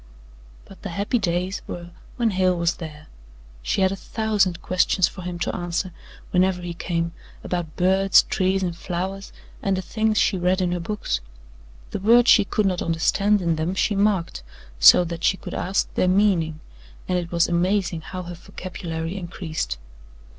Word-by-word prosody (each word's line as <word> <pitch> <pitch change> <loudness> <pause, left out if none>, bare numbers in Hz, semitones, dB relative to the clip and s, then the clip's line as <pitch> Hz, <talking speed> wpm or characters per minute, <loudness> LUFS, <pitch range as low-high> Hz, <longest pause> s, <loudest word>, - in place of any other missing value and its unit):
But 195 - -15
the - - -5
happy 200 +7 0
days 180 0 -1
were 175 0 -7 0.2
when 235 -2 +1
Hale 185 -1 +2
was 170 0 0
there. 155 -2 -9 0.6
She - - -1
had 190 0 +3
a - - -2
thousand 205 -4 0
questions 185 0 +2
for 185 - -9
him 180 0 -5
to 170 - -2
answer, 175 +1 -2 0.4
whenever 180 0 +2
he 175 -1 -4
came, 170 -1 -2 0.3
about 175 -3 -3
birds, 190 +1 +4
trees 190 +1 0
and 175 -2 -2
flowers 190 +3 -4 0.3
and 195 -1 0
the 190 - -3
things 220 +3 0
she 190 - +2
read 180 +2 +2
in 180 -1 0
her 175 - -1
books. 170 - -2 0.7
The - - -3
words 235 +5 +6
she 205 - +6
could 210 +1 0
not 185 -2 0
understand 190 +5 +2
in 165 -2 +1
them 165 +4 -1
she 205 +2 +1
marked, 195 - +1 0.4
so - - +8
that 170 -1 -6
she 190 - +3
could - - -8
ask 190 +2 -1
their 185 - +1
meaning, 180 -5 +2 0.5
and 180 -1 +1
it 170 -1 -6
was 170 -1 +3
amazing 175 0 0
how 185 +3 -6
her 175 0 -7
vocabulary 170 -1 -6
increased. 160 - -4
180 Hz, 175 wpm, -23 LUFS, 170-195 Hz, 0.7 s, so